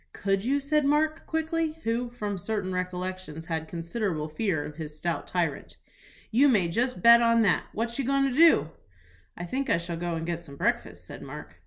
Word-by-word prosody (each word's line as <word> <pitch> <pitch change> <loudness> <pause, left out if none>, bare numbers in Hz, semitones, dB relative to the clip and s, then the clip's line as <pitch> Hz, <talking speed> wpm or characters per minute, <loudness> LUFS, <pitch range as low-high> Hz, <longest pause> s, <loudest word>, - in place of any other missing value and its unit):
"Could 195 0 0
you?" 275 +4 +1
said 300 +2 +1
Mark, 305 +3 +1
quickly, 320 0 -1
who, 235 +2 -1
from 210 -4 -4
certain 195 0 -3
recollections, 180 -3 -4
had 160 -1 -3
considerable 170 -2 -3
fear 155 -1 -1
of 150 - -9
his 155 -2 -7
stout 170 +1 -3
tyrant. 170 -6 -2 0.5
"You 275 +6 +5
may 195 -9 +3
just 245 +8 -1
bet 235 0 +9
on 230 -1 +4
that. 205 - +2
What 235 +3 -3
you 270 - 0
goin' 275 +1 +2
to 255 - -2
do?" 295 - +5 0.7
"I 175 - -5
think 265 +10 -2
I - - +4
shall 170 0 -4
go 175 0 -2
and 165 0 -3
get 170 -1 -2
some 140 -5 -11
breakfast," - - -2
said - - -9
Mark. 80 +3 -10
195 Hz, 195 wpm, -27 LUFS, 170-250 Hz, 0.7 s, bet